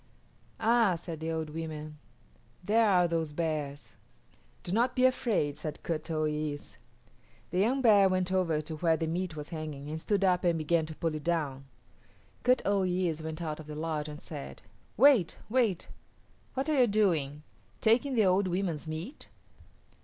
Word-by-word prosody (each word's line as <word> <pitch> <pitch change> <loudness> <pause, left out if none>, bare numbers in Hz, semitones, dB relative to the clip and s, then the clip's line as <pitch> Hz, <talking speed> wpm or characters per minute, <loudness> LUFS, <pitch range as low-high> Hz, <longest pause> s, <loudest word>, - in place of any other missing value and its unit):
"Ah," 230 -5 +3
said 165 -1 -7
the 160 +1 -3
old 160 -1 -3
women, 155 -1 -6 0.6
"there 220 +3 +3
are 180 -2 +4
those 165 -3 -2
bears." 150 -3 -3 0.7
"Do 175 - -4
not 240 +5 +2
be 255 - +4
afraid," 220 - +1
said 150 -1 -6
Kut 160 -1 -3
o 155 -1 0
yis´. 150 -1 -3 0.7
The 180 - 0
young 255 +7 +2
bear 205 -4 +6
went 185 0 0
over 170 -5 +1
to 155 +1 -6
where 165 0 +2
the 165 - -1
meat 170 +1 -2
was 150 -1 -7
hanging 150 -3 -6
and 160 +1 -4
stood 200 +1 0
up 180 -1 +3
and 170 -2 +2
began 160 +1 +1
to 155 - -8
pull 165 0 -1
it 155 -1 -5
down. 145 -5 -1 0.8
Kut 250 +1 +3
o 200 0 +2
yis´ 180 -3 0
went 160 +1 -5
out 155 -1 -4
of 155 - -10
the 150 - -7
lodge 155 -1 -3
and 150 0 -8
said, 70 0 -8 0.3
"Wait; 245 - +5
wait! 225 -8 +1 0.7
What 265 +2 -1
are 305 -3 +2
you 245 - +5
doing, 165 -9 +1 0.4
taking 250 +5 +2
the 220 -3 +4
old 190 +1 +3
women's 175 -4 -2
meat?" 160 - -6
165 Hz, 175 wpm, -30 LUFS, 155-200 Hz, 0.8 s, bear